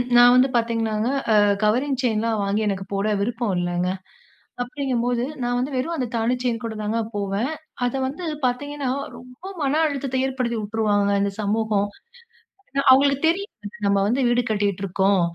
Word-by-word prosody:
நான் 245 0 +8
வந்து 255 +2 +5
பாத்தீங்கனாங்க, 230 -2 0 0.2
அ - - +5 0.3
கவரிங் 255 +6 +2
செயின்லாம் 225 -2 0
வாங்கி 200 +2 0
எனக்கு 195 -1 -2
போட 200 +1 0
விருப்போம் 230 -1 -1
இல்லங்க. 175 0 -1 0.7
அப்படிங்கும்போது 245 -2 -1 0.2
நான் 245 0 0
வந்து 265 +3 -2
வெறும் 315 +7 -1
அந்த 255 - -1
தாலி 230 +2 +1
செயின் 240 -1 -1
கூட 225 -1 -4
தாங்க 215 +2 -1 0.2
போவேன். 205 +7 -1 0.3
அத 245 - -1
வந்து 290 +7 -6 0.2
பாத்தீங்கன்னா, 285 +2 -2 0.3
ரொம்ப 250 +4 -15 0.2
மன 290 +3 +2
அழுத்தத்தை 270 -3 -2
ஏற்படுத்தி 250 -3 -2
வுட்டுருவாங்கங்க 205 -1 +1
இந்த 200 - 0
சமூகம். 210 -1 +1 0.8
ஏன்னா, 275 0 0
அவுங்களுக்கு 280 +3 +4
தெரியும். 330 - -4 0.2
நம்ம 200 0 +3
வந்து 255 +3 +1
வீடு 240 +1 +2
கட்டிகிட்டுருக்கோம், 195 -2 +1
235 Hz, 150 wpm, -23 LUFS, 205-260 Hz, 0.8 s, நான்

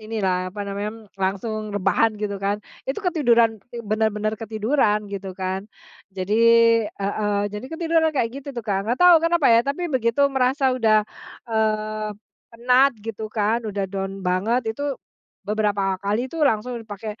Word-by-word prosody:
inilah, 190 -4 -1
apa 205 +3 -8
namanya, 200 +1 -3 0.3
langsung 215 +3 -2
rebahan, 205 +3 +2
gitu 205 -2 -4
kan. 200 +1 0 0.3
Itu 290 +10 -3
ketiduran, 235 - +3
ti 235 -1 -8
benar-benar 215 0 0
ketiduran, 215 0 +1
gitu 195 -2 -6
kan. 190 +2 -3 0.5
Jadi, 190 +3 -1 0.5
heeh, 205 +1 -2 0.2
jadi 210 +4 -6
ketiduran 325 -1 +2
kayak 230 -3 +1
gitu 280 - -11
tuh, 235 - -4
Kak. 200 -3 0
Nggak 245 - 0
tahu 355 -1 +9
kenapa, 335 -3 +2
ya. 230 - +6
Tapi, 285 +6 -2
begitu 235 +1 +1
merasa 265 +1 +2
udah, 220 -4 +3 0.5
eee, 215 -1 0 0.4
penat, 250 +4 +3
gitu 220 -1 -5
kan, 215 +1 0
udah 200 -1 -2
down 195 0 -4
banget, 220 +6 0
itu 285 +3 -3 0.5
beberapa 200 -2 0
kali 210 +6 -1
itu 330 - -4
langsung 240 -3 +1
dipake 215 0 -8
215 Hz, 150 wpm, -23 LUFS, 205-245 Hz, 0.5 s, tahu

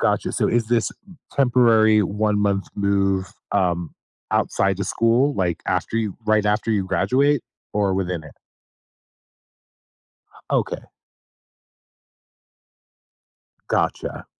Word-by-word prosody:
Gotcha. - - +1
So - - +1
is 120 -1 +1
this 115 0 +1 0.4
temporary 115 -5 +4
one-month 105 0 0
move, 100 -1 +1 0.3
um, 85 -3 0 0.4
outside 95 -1 +1
the 100 - -3
school, 115 +8 +2
like, 90 -3 -1
after - - -1
you 110 -4 -1
right 110 -1 +3
after 105 +2 0
you 100 -3 +1
graduate 140 +7 +2 0.3
or 100 -2 +1
within 90 -3 -2
it? 75 - -13 2.2
Okay. - - -1 2.9
Gotcha. - - -1
105 Hz, 95 wpm, -22 LUFS, 95-115 Hz, 2.9 s, temporary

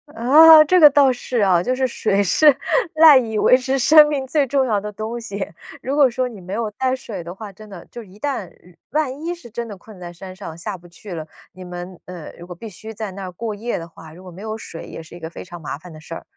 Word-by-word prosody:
啊， 305 +7 +8
这 365 +4 +3
个 300 -3 +9
倒 280 -2 +4
是 245 0 -3
啊， 185 -4 +3
就 250 +7 -1
是 260 0 0
水 205 -5 0
是 285 - +4 0.4
赖 315 -3 +8
以 225 -4 -1
维 250 - +5
持 260 +1 -1
生 300 +3 +7
命 285 -3 -2
最 280 +1 0
重 270 +1 +1
要 215 -5 0
的 210 +1 -6
东 220 +3 -5
西。 200 -4 -5 0.4
如 270 +2 -3
果 280 -3 +5
说 250 +1 -2
你 220 -4 -11
没 185 +1 -8
有 220 0 -2
带 255 +5 -1
水 220 -7 -8
的 170 +2 -9
话， 210 0 -9
真 215 +2 -15
的， 185 -4 -11
就 240 - -8
一 200 -2 -16
旦 245 -8 -4 0.4
万 290 -1 -2
一 350 +1 -2
是 340 -9 -14
真 235 +1 -5
的 210 - -8
困 205 +1 -15
在 175 -1 -9
山 185 +2 -10
上 185 -4 -9
下 190 +3 -6
不 175 0 -17
去 180 +3 -11
了， 160 -2 -6 0.2
你 185 0 -12
们， 180 0 -8
呃， 180 -4 -9
如 175 - -11
果 180 - -9
必 220 +6 -9
须 220 +3 -10
在 215 -2 -6
那 195 +1 -8
儿 185 - -6
过 220 +4 -5
夜 230 +4 -4
的 165 - -7
话， 160 -1 -14
如 180 +3 -14
果 185 - -11
没 180 +3 -12
有 220 0 -5
水， 165 -6 -9
也 165 - -9
是 160 - -16
一 - - -11
个 160 -1 -7
非 - - -10
常 175 -1 -11
麻 145 - -5
烦 175 +3 -14
的 155 - -12
事 165 +1 -10
儿。 - - -9
215 Hz, 295 characters per minute, -20 LUFS, 180-255 Hz, 0.4 s, 个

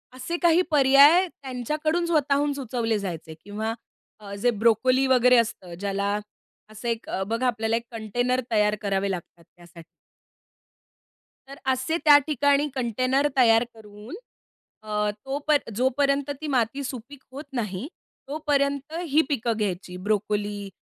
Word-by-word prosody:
असे 260 +7 -4
काही 345 0 +5
पर्याय 290 +5 +6
त्यांच्याकडून 300 +4 -3
स्वतःहून 290 -3 +1
सुचवले 235 -5 -2
जायचे 170 -4 -6
किंवा 215 +3 -4 0.5
अ, 200 -1 -9
जे 240 +5 +1
ब्रोकोली 235 +4 +2
वगैरे 250 -1 +5
असतं 205 -6 -1
ज्याला 200 +1 -1 0.5
असं 215 +3 -8
एक 230 -1 -3 0.2
बघा 230 +4 -1
आपल्याला 225 -1 0
एक 230 - -2
कंटेनर 245 +3 -1
तयार 210 -1 +2
करावे 200 -1 -1
लागतात 175 -1 -7
त्यासाठी. 170 0 -16 1.6
तर 275 - -10 0.2
असे 260 +6 -1
त्या 295 -1 +9
ठिकाणी 285 0 +2
कंटेनर 255 +3 +1
तयार 230 -2 +5
करून 215 - -11 0.7
अ, 210 -1 -1 0.2
तोप 285 +3 -2 0.2
जोपर्यंत 275 +3 +1
ती 310 - -4
माती 265 0 0
सुपीक 260 +2 -7
होत 280 +3 -7
नाही, 220 0 -3 0.4
तोपर्यंत 285 0 -1 0.2
ही 300 +3 +4
पिकं 235 -5 -1
घ्यायची, 185 -3 -3
ब्रोकोली 205 -1 -1
245 Hz, 125 wpm, -25 LUFS, 210-280 Hz, 1.6 s, त्या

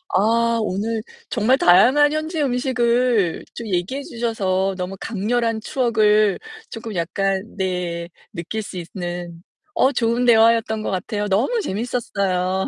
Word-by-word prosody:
아 230 +2 +2
오늘 215 +2 -2 0.3
정말 245 +3 +2
다양한 255 +12 +5
현지 310 +1 -2
음식을 245 - +1
좀 230 -2 -7
얘기해 195 +10 -2
주셔서 195 -6 -1
너무 185 +1 -4
강렬한 225 +1 -1
추억을 215 -5 +2 0.3
쪼끔 225 -3 -7
약간 190 +3 -1
네 180 -2 -3 0.2
느낄 190 +5 -4
수 200 -3 -8
있는 175 -1 -6 0.3
어 265 - +3
좋은 235 0 0
대화였던 225 -1 +4
것 - - -2
같아요. 205 +2 -2
너무 230 - +1
재밌었어요. 195 - -1
215 Hz, 265 characters per minute, -21 LUFS, 190-235 Hz, 0.3 s, 다양한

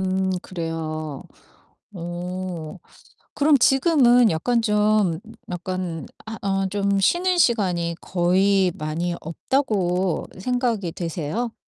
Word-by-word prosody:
음 190 0 0
그래요. 155 -4 -4 0.7
어 175 -1 -5 0.6
그럼 295 0 +4
지금은 255 -3 +5
약간 230 +9 +1
좀 210 -5 +2 0.3
약간 180 -3 -4 0.2
아 220 0 -6
어 195 -1 0
좀 200 0 0
쉬는 355 - +2
시간이 180 - +2
거의 190 +1 +2
많이 160 +3 -2
없다고 185 - 0
생각이 235 -6 -1
되세요? 170 +8 -3
185 Hz, 185 characters per minute, -23 LUFS, 170-225 Hz, 0.7 s, 지금은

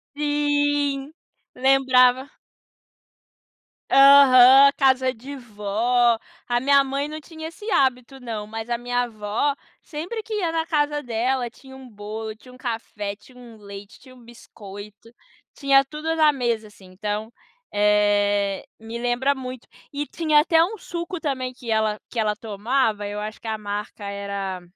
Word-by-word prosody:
Sim, 290 -1 0 0.4
lembrava. 260 0 +3 1.6
Aham, 275 0 +8
casa 260 -2 +3
de 265 +5 -9
vó. 235 +1 0 0.3
A 240 0 +1
minha 280 +1 +5
mãe 275 +1 -3
não 310 0 -6
tinha 315 +1 -9
esse 420 +6 -9
hábito 265 0 0
não, 225 -4 -6
mas 225 +2 -7
a 235 - 0
minha 245 0 -1
vó, 215 +6 -1 0.3
sempre 360 +8 -6
que 445 - -7
ia 370 -6 -1
na 325 -1 -1
casa 295 -2 0
dela 245 +1 -1
tinha 265 +2 -15
um 265 -1 -12
bolo, 215 +1 -7
tinha 250 +3 -17
um - - -14
café, 225 -5 -5
tinha 250 +5 -20
um 235 -2 -13
leite, 200 -1 -11
tinha 255 0 -16
um 245 - -18
biscoito, 210 -2 -12 0.4
tinha 275 -1 +4
tudo 305 +3 -4
na 310 -2 +5
mesa, 235 -5 -2
assim, 205 -2 -18
então, 210 +4 -5 0.4
eh, 205 -1 +2
me 225 +1 -7
lembra 245 +3 0
muito. 255 -2 -8 0.2
E 290 +1 -3
tinha 310 -3 +2
até 325 +1 +4
um 425 +5 -3
suco 345 0 -6
também 260 -4 -3
que 245 -2 -10
ela 220 -1 +1
que - - -10
ela 210 -1 +1
tomava, 215 0 -1
eu 205 +1 -5
acho 215 +1 -6
que 225 - -9
a 220 - -2
marca 205 0 -6
era 200 -2 -5
245 Hz, 155 wpm, -23 LUFS, 215-280 Hz, 1.6 s, Aham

